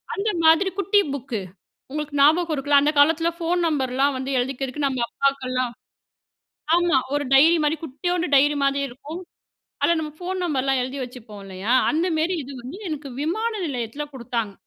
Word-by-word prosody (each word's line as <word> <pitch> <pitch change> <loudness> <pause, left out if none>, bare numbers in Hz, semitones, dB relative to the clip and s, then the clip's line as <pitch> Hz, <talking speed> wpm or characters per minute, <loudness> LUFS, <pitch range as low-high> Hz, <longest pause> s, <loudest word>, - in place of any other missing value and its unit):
அந்த 420 +2 -1 0.2
மாதிரி 325 +4 +5
குட்டி 405 +2 +3
புக்கு 245 -6 -4 0.5
உங்களுக்கு 300 -1 -3
ஞாபகம் 320 +3 +4
இருக்குல்ல 285 0 +3
அந்த 300 - +3
காலத்துல 325 +3 +4
ஃபோன் 345 +1 0
நம்பர்லா 270 -3 +1
வந்து 265 +1 -4
எழுதிக்கிறதுக்கு 270 +2 -2
நம்ம 260 -2 -1
அப்பாக்கெல்லா 260 -2 0 1.1
ஆமா 345 -4 +3 0.2
ஒரு 290 0 0
டைரி 320 +5 +6
மாரி 300 +2 +1
குட்டியோண்டு 350 +5 -2
டைரி 290 +2 +4
மாதிரி 275 0 +2
இருக்கும். 290 +8 -9 0.6
அதுல 340 - +3
நம்ம 305 -1 -4
ஃபோன் 370 +1 -4
நம்பர்லாம் 270 -4 0
எழுதி 260 +2 -5
வச்சுப்போ 240 -4 -10
இல்லையா? 195 +4 -3 0.2
அந்தமேரி 325 +2 0
இது 275 +2 -9
வந்து 260 +9 -8
எனக்கு 295 -2 -5
விமான 440 +10 -1
நிலையத்துல 255 +1 -4
கொடுத்தாங்க. 235 -4 -3
285 Hz, 150 wpm, -23 LUFS, 260-330 Hz, 1.1 s, டைரி